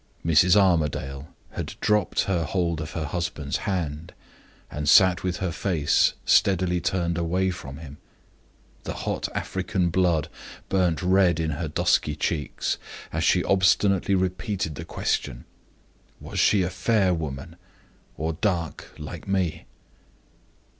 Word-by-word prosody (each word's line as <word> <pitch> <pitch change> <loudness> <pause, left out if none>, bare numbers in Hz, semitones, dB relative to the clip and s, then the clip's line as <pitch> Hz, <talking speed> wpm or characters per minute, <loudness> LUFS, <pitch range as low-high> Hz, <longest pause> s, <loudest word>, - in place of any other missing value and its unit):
Mrs. 85 +3 +5
Armadale 75 -6 0 0.2
had - - -6
dropped 105 -1 +1
her 90 -4 0
hold 85 -1 -1
of 75 - -6
her 80 -3 -3
husband's 75 -3 -3
hand, 80 -4 -3 0.6
and 75 -1 -2
sat 95 -2 +6
with 90 -1 -1
her 95 -2 -2
face 85 -6 +2
steadily 90 -2 +3
turned 85 -2 -1
away 90 +3 0
from 70 -6 -8
him 75 -2 -10 0.8
The - - -6
hot - - -3
African 95 -2 -1
blood 85 -4 +2 0.4
burned 90 -5 +1
red 90 -2 +3
in 80 -1 -1
her 80 +2 -3
dusky 75 0 +1
cheeks 75 -2 -2 0.3
as 80 0 -1
she 90 0 +3
obstinately 100 0 +3
repeated 95 -1 -2
the 80 +3 -7
question: - - -2 0.7
"Was - - -5
she 100 -3 +4
a 90 - -2
fair 95 0 +2
woman, 70 -5 -5 0.6
or 80 +1 -2
dark, 85 -3 -2
like 75 +3 -8
me?" 95 -5 -1
85 Hz, 130 wpm, -25 LUFS, 80-95 Hz, 0.8 s, sat